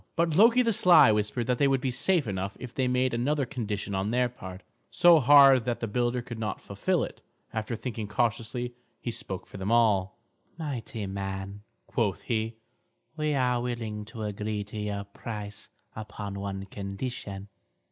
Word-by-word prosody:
But 165 -2 +1
Loki 230 +6 +6
the 230 -2 +2
sly 180 - +7
whispered 105 +3 0
that 125 0 0
they 140 - +5
would 135 -1 +2
be 130 0 -1
safe 160 +5 +2
enough 95 -1 -3
if 125 -2 -8
they 130 -1 0
made 125 0 +1
another 140 +4 +1
condition 110 -6 -4
on 95 +2 -1
their 125 +1 +2
part, 95 -5 -10 0.3
so 175 -2 +6
hard 135 -2 +7
that 120 -1 -1
the - - -2
builder 120 +2 0
could 115 -2 -7
not 105 -3 -3
fulfil - - -1
it. - - -7 0.3
After 110 +1 -2
thinking 110 -2 -5
cautiously, 120 +3 -1 0.3
he 120 - -4
spoke 100 -5 -5
for - - -11
them 95 +3 -2
all. 105 -5 +3 0.4
"Mighty 130 -8 -4
man," 95 +1 -5 0.2
quoth 105 -6 -1
he, 115 -1 -1 0.6
"we 155 -1 0
are 125 -2 +1
willing 115 -4 -3
to 110 0 -7
agree 105 0 -3
to 105 +1 -7
your 105 -1 -3
price 105 0 -7 0.3
upon 105 -2 -6
one 95 -1 -4
condition. 100 0 -6
115 Hz, 170 wpm, -28 LUFS, 105-125 Hz, 0.6 s, sly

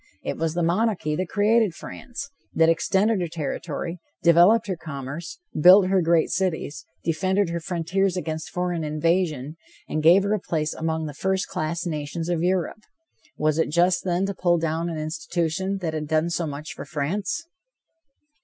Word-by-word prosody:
It - - -2
was 165 0 -2
the 175 - +1
monarchy 175 -3 +1
that 185 +1 -2
created 215 -3 +3
France, 280 +3 -8 0.2
that 165 0 +5
extended 190 +5 +2
her 175 - -1
territory, 165 +2 -4 0.2
developed 175 +7 +6
her 190 -3 -2
commerce, 155 - -7 0.2
built 185 +4 +7
her 190 -1 +3
great 165 -1 +2
cities, 175 -5 -2 0.2
defended 185 +3 +1
her 170 - -2
frontiers 180 +3 -1
against 160 -3 -4
foreign 175 -2 -2
invasion, 155 -1 0 0.3
and 155 - -2
gave 175 +5 +6
her 200 +1 +1
a 215 - +1
place 155 -4 -2
among 160 0 -2
the 150 - -5
first 190 +5 -1
class 170 -2 -2
nations 160 +1 -3
of 170 -2 0
Europe. 180 +3 0 0.6
Was 155 +1 +1
it 160 - +2
just, 175 +3 +2
then, 180 +1 0
to 200 - -2
pull 175 -2 +2
down 165 +1 -1
an 165 - -4
institution 165 +4 -2
that 165 -3 -2
had 155 -1 -3
done 160 +2 +1
so 170 -1 -1
much 145 +2 -6
for - - -7
France? 175 - -2
170 Hz, 170 wpm, -24 LUFS, 155-190 Hz, 0.6 s, built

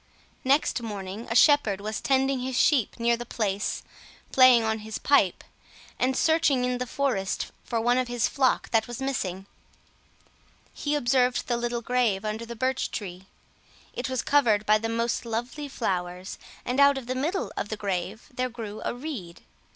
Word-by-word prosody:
Next 270 -1 +2
morning 205 -1 -6
a 230 - -2
shepherd 265 -8 +5
was 215 +2 -4
tending 270 0 +2
his 255 0 -3
sheep 265 -9 +2
near 235 0 +3
the 240 - -6
place, 210 -4 -2 0.5
playing 255 -3 +7
on 220 0 0
his 215 0 -6
pipe, 245 -10 +2 0.6
and 260 +1 +1
searching 315 -6 +3
in 250 0 -1
the 250 - -3
forest 235 -9 -1
for 230 - -2
one 245 +2 +2
of 255 - -1
his 240 -1 0
flock 265 -2 +1
that 225 0 +2
was 240 -1 -6
missing. 195 -9 -3 1.3
He 295 0 -2
observed 250 -2 +2
the 240 - 0
little 235 0 -2
grave 230 -5 +1
under 220 +2 -3
the 235 - -6
birch 260 +3 -1
tree; 190 -2 -7 0.7
it 245 - -4
was 260 -2 -1
covered 225 -8 +3
by 215 +1 +4
the 225 +1 -3
most 230 +1 -1
lovely 240 +6 -4
flowers, 180 -7 -3 0.3
and 250 +2 -1
out 280 0 +6
of 265 - -6
the 255 - -2
middle 310 +9 -2
of 205 - -3
the 215 - -3
grave 195 +1 -3
there 255 +1 -1
grew 220 -3 -7
a - - -2
reed. 245 - -7
240 Hz, 175 wpm, -26 LUFS, 215-260 Hz, 1.3 s, playing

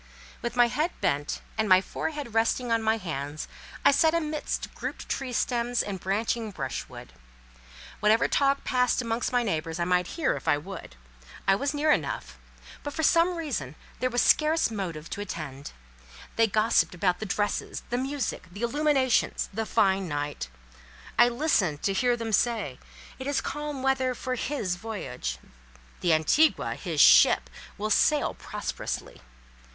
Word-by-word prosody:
With 235 0 -3
my 245 -1 +6
head 305 +8 0
bent, 145 +1 -1 0.2
and 215 -2 +1
my 185 0 +8
forehead 280 +5 -5
resting 230 +2 +1
on 230 0 +2
my 220 0 +2
hands, 155 -6 -5 0.4
I - - +8
sat 320 +3 +4
amidst 305 -2 -2
grouped - - -6
tree 265 -2 -3
stems 240 0 0
and 195 -2 -5
branching 220 +4 -1
brushwood. 130 - -6 0.9
Whatever 215 +2 +4
talk 275 0 +2
passed 250 0 +1
amongst 230 +1 -1
my 245 -1 +2
neighbours, 165 -5 -2
I 170 - +1
might 180 0 +2
hear, 330 - +1
if - - -8
I - - +4
would; 160 - -9 0.5
I 195 - +6
was 280 +8 -1
near 305 +1 +3
enough; - - -2 0.4
but 290 - -5
for 320 - -1
some 335 +4 +4
time, 280 - -4 0.2
there 255 +2 +1
was 245 -1 +2
scarce 310 -4 +3
motive 170 -7 -4
to 205 - -4
attend. 150 -8 -6 0.6
They 225 0 +4
gossiped 215 -2 +2
about 180 0 +1
the 215 - -4
dresses, 205 +2 -2
the 245 - +1
music, 270 -6 -3
the 200 +6 -7
illuminations, 270 -1 +1
the 220 +2 -2
fine 195 -4 +2
night. 145 - -3 0.7
I 240 0 +7
listened 235 - +1
to 195 - +1
hear 245 +4 +2
them 230 -1 -4
say, 215 - +1 0.4
"It 260 - -5
is 285 -2 +1
calm 295 -1 -4
weather 260 -1 +1
for 255 0 -3
his 235 -8 -2
voyage; 195 - -5 0.6
the 175 - +1
Antigua" 160 - +3
(his - - -4
ship) - - +7 0.3
"will 215 +1 -2
sail 300 +6 +3
prosperously." - - -5
225 Hz, 155 wpm, -27 LUFS, 185-270 Hz, 0.9 s, my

